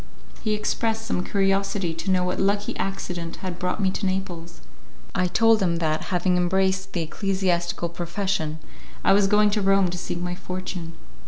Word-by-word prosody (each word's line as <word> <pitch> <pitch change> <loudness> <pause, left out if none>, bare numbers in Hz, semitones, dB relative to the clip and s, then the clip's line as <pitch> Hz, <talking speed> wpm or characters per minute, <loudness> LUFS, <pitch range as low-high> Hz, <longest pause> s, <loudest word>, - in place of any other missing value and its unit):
He 215 -1 +1
expressed 225 +1 -1
some 180 -5 -1
curiosity 195 -2 +1
to 165 +4 -4
know 185 -1 +3
what 180 0 -1
lucky 200 +1 +1
accident 175 -3 -3
had 180 -2 -4
brought 180 +3 -1
me 190 -2 +2
to 200 - -3
Naples; 175 -3 -4 0.5
I 185 -1 +2
told 225 +3 +4
him 175 -3 +2
that, 160 -2 0
having 180 -1 +1
embraced 190 +1 +1
the 170 - 0
ecclesiastical 175 -1 0
profession, 170 -2 -2 0.5
I 195 - +5
was 200 0 +4
going 210 +1 +4
to 210 0 +1
Rome 195 -2 +3
to 180 - -4
seek 175 - -4
my 180 0 -2
fortune. 180 -2 -5
185 Hz, 170 wpm, -25 LUFS, 175-195 Hz, 0.5 s, I